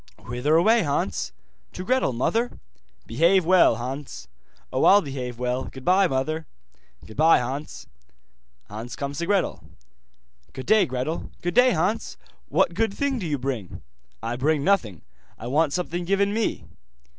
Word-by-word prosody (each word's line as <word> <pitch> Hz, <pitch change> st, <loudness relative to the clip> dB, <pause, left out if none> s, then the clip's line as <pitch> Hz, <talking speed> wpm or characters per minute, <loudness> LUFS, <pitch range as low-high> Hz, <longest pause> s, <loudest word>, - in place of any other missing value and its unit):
'Whither 125 Hz, +6 st, 0 dB
away, 220 Hz, +8 st, +5 dB
Hans?' 140 Hz, -, -1 dB, 0.4 s
'To 185 Hz, -, -6 dB
Gretel, 255 Hz, -, +1 dB
mother.' 225 Hz, -, -1 dB, 0.5 s
'Behave 170 Hz, +9 st, +3 dB
well, 185 Hz, -8 st, +5 dB
Hans.' 130 Hz, -, -6 dB, 0.5 s
'Oh, -, -, +1 dB
I'll 200 Hz, +1 st, +7 dB
behave 130 Hz, -4 st, -5 dB
well. 125 Hz, +1 st, -2 dB
Goodbye, 185 Hz, +9 st, +2 dB
mother.' 155 Hz, +3 st, -2 dB, 0.6 s
'Goodbye, 155 Hz, +9 st, +4 dB
Hans.' 135 Hz, +5 st, -5 dB, 0.8 s
Hans 115 Hz, +4 st, -7 dB
comes 140 Hz, +1 st, -5 dB
to 170 Hz, -, -2 dB
Gretel. 200 Hz, -2 st, 0 dB, 0.9 s
'Good 130 Hz, -, -7 dB
day, 215 Hz, -1 st, +4 dB
Gretel.' 130 Hz, +6 st, -3 dB
'Good 175 Hz, -, -1 dB
day, 250 Hz, +1 st, +5 dB
Hans. 185 Hz, +7 st, -1 dB, 0.3 s
What 170 Hz, -, +2 dB
good 205 Hz, +2 st, 0 dB
thing 280 Hz, -3 st, -1 dB
do 180 Hz, -, -4 dB
you 145 Hz, -2 st, -1 dB
bring?' 125 Hz, -8 st, -5 dB, 0.4 s
'I 120 Hz, +1 st, -3 dB
bring 145 Hz, +2 st, +1 dB
nothing, 130 Hz, -, +1 dB, 0.3 s
I 110 Hz, -, -9 dB
want 145 Hz, +4 st, +1 dB
something 175 Hz, +2 st, -2 dB
given 200 Hz, +3 st, +1 dB
me. 220 Hz, 0 st, -1 dB
155 Hz, 145 wpm, -24 LUFS, 125-190 Hz, 0.9 s, I'll